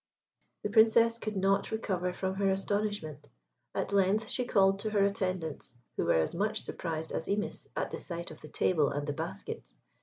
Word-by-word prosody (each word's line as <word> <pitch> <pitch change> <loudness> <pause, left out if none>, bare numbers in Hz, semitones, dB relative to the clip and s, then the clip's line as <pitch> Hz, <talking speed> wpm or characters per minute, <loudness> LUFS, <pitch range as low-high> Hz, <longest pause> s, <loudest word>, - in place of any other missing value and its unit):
The 210 - -1
Princess 230 +1 +5
could 215 -2 -4
not 195 +1 +2
recover 185 -5 -1
from 190 +1 -2
her 195 0 +1
astonishment. 195 -6 -1 0.5
At - - -1
length 200 +3 +3
she 250 - -1
called 195 -4 +4
to 215 - -2
her 205 -2 +3
attendants, 185 -10 -2 0.2
who - - 0
were - - +4
as 80 -1 +2
much 210 +4 0
surprised 160 -2 -4
as 160 - -2
Imis 205 +1 -2
at - - -1
the - - -4
sight 170 -1 -5
of 155 - -12
the 155 - -10
table 155 -1 +2
and 145 0 -2
the 145 - -2
baskets. 130 - -6
195 Hz, 185 wpm, -31 LUFS, 170-210 Hz, 0.5 s, Princess